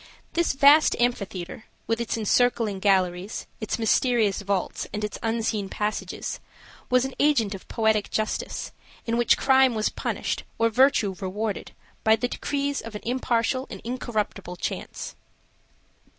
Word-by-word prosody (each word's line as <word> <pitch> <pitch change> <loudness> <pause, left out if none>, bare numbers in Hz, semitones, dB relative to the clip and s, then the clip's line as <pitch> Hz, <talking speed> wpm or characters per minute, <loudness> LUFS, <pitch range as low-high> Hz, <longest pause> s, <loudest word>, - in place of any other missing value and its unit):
This 340 -3 +2
vast 285 +3 +6
amphitheater, 200 -6 -2 0.2
with 225 +1 0
its 235 - -2
encircling 225 -2 +2
galleries, 190 -1 +1
its 215 - -2
mysterious 225 -2 +2
vaults, 200 -2 -2
and 210 0 -4
its 210 - -4
unseen 225 -3 -1
passages, 210 +2 -3 0.5
was 255 0 +4
an 265 - -5
agent 255 -9 +3
of 195 - -9
poetic 220 -2 +1
justice, 215 0 -2 0.3
in 230 - 0
which 240 0 +4
crime 265 -2 +4
was 215 -1 +1
punished, - - -3 0.2
or 230 0 +3
virtue 250 -5 +4
rewarded, 205 +2 -3 0.3
by 220 0 +6
the 245 +3 -1
decrees 285 +2 -2
of 230 -2 -9
an 210 - -5
impartial 250 +1 0
and - - -7
incorruptible 220 -6 -3
chance. - - -5
225 Hz, 135 wpm, -25 LUFS, 205-250 Hz, 0.5 s, vast